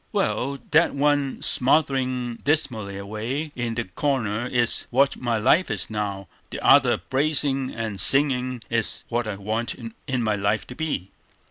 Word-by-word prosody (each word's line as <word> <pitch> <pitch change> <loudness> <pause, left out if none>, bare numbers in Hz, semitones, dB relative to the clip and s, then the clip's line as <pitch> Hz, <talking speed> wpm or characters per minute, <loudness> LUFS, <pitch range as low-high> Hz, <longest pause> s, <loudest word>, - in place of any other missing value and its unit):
Well 140 +2 -1
that 160 0 +4
one 145 -1 +1
smouldering 130 -3 +1
dismally 115 -10 -1
away 110 +10 -4
in 120 -2 -3
the 120 - -1
corner 115 +1 -1
is 120 -2 0
what 135 +3 +3
my 120 -2 -1
life 135 +11 +3
is 110 -1 -3
now; 100 -3 -3 0.2
the - - -6
other - - +6
blazing 135 -1 0
and 110 -5 -3
singing 130 -2 +3
is 115 -2 -2
what 120 -1 -1
I 105 - -3
want 110 +4 -3 0.3
my 115 -5 0
life 100 +2 0
to 125 - -10
be." 125 - -3
120 Hz, 145 wpm, -24 LUFS, 110-135 Hz, 0.3 s, other